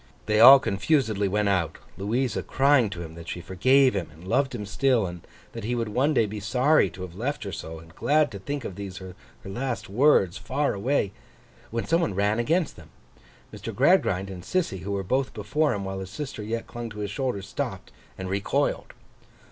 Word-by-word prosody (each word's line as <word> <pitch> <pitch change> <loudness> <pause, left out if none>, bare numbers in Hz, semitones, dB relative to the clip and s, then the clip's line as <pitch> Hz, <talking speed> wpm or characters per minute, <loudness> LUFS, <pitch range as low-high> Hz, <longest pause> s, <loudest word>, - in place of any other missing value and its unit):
They 110 0 +2
all 130 +4 +11
confusedly 110 -2 +1
went 105 +2 +1
out: 90 -5 0 0.2
Louisa 115 +6 -1
crying 135 -4 +3
to 85 -3 -6
him 80 -1 -9
that 85 0 -10
she - - -4
forgave 130 +10 +3
him, 90 -6 -3
and 80 +4 -14
loved 130 +5 +1
him 105 -3 -5
still, 110 +3 +2
and 90 -1 -6 0.3
that - - -7
he 120 +3 -1
would 115 -2 -2
one 130 +8 +2
day 115 - +4
be 105 +1 -5
sorry 125 +3 +3
to 90 +2 -9
have 90 -2 -8
left 130 +10 -3
her 100 - -5
so, 80 -3 -7
and 80 0 -14
glad 150 - +2
to 100 - -7
think 140 +4 -4
of - - -5
these 95 -1 -7
her 95 -1 -8 0.3
last 120 +5 -4
words, 110 - +3
far 145 +2 -1
away: 105 0 0 0.6
when 115 +1 -3
some 165 +1 +2
one 105 - -1
ran 105 +3 +1
against 160 +7 0
them. 80 -2 -14 0.6
Mr. - - -7
Gradgrind 95 +1 +3
and 90 -2 -8
Sissy, 160 - -1
who 95 +3 -5
were 100 -1 -1
both 130 +7 -1
before 140 +9 0
him 100 -4 -3
while 95 0 -4
his 95 -1 -6
sister 135 +1 -6
yet 115 +2 -3
clung 120 -1 -6
to 105 - -11
his 100 -1 -3
shoulder, 125 -4 -2
stopped - - -5 0.3
and 95 - -5
recoiled. 100 +1 -1
105 Hz, 205 wpm, -26 LUFS, 95-130 Hz, 0.6 s, all